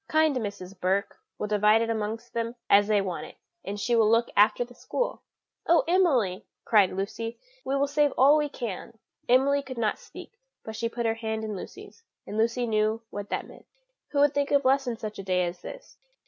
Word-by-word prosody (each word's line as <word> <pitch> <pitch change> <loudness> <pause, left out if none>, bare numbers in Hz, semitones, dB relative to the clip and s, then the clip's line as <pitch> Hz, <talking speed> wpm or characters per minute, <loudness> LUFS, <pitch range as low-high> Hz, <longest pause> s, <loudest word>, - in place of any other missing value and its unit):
Kind 315 -2 +3
Mrs. 200 -5 -5
Burke 190 +3 -1 0.2
will - - -3
divide 210 +1 +3
it 230 - -3
amongst 225 +2 -4
them 230 +1 -2 0.2
as 205 0 +6
they 210 -2 +3
want 185 -3 -4
it; - - -15 0.3
and 205 +1 -5
she 240 +3 +1
will 220 -2 +4
look 230 +1 +2
after 215 +4 +4
the 245 - -16
school." - - -3 0.5
"Oh, 340 - +5
Emily!" 260 - +2 0.2
said 205 -5 +5
Lucy, 220 +4 -4 0.3
"we 270 - -1
will 275 0 +2
save 290 0 +2
all 280 +3 +7
we 300 -1 +1
can." 230 -3 -6 0.3
Emily 275 +3 +4
could 260 -2 -9
not 220 -2 0
speak, 475 - -13 0.2
but 220 - -7
she 230 +1 -2
put 235 0 -4
her 225 - +2
hand 220 -1 -4
in 215 -1 -4
Lucy's, 195 - -10 0.2
and 205 - -7
Lucy 235 +3 +1
knew 215 0 0
what 205 0 -6
that - - -3
meant. - - -16 0.4
Who 285 - 0
could 290 0 +3
think 285 0 0
of 280 -1 +2
lessons 260 -3 +2
such 215 -1 -6
a - - -5
day 180 -1 +1
as 175 0 -6
this? - - -11
230 Hz, 205 wpm, -27 LUFS, 210-270 Hz, 0.5 s, all